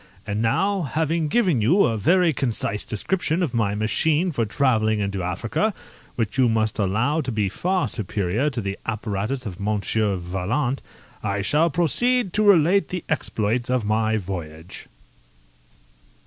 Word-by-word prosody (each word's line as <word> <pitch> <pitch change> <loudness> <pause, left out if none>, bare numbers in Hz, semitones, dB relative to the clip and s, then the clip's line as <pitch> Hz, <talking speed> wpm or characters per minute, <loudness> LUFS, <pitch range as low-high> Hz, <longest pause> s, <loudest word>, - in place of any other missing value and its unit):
And 105 +1 -2
now, 195 - +1
having 160 +2 -1
given 175 - +2
you 170 - +4
a 115 - +1
very 170 - +3
concise 115 -6 -2
description 170 - -1
of 145 -8 -2
my 105 -3 0
machine 155 - +1
for 115 -7 -1
travelling 110 -3 +1
into 100 -2 -2
Africa, 115 - -1 0.4
which 115 +2 -2
you 125 -2 +5
must 110 0 0
allow 110 +11 +1
to 130 -3 -4
be 105 -3 0
far 180 - 0
superior 105 +4 -1
to 125 -4 -4
the 100 -1 -4
apparatus 110 +3 -3
of 95 -3 -6
Monsieur 105 0 0
Vaillant, 95 +10 -2 0.4
I 100 0 -2
shall 150 - +3
proceed 195 - +2
to 215 - +2
relate 195 -1 +4
the 180 -2 -4
exploits 120 -6 -1
of 125 -4 0
my 110 +1 +1
voyage. 85 -4 -7
115 Hz, 150 wpm, -23 LUFS, 105-160 Hz, 0.4 s, you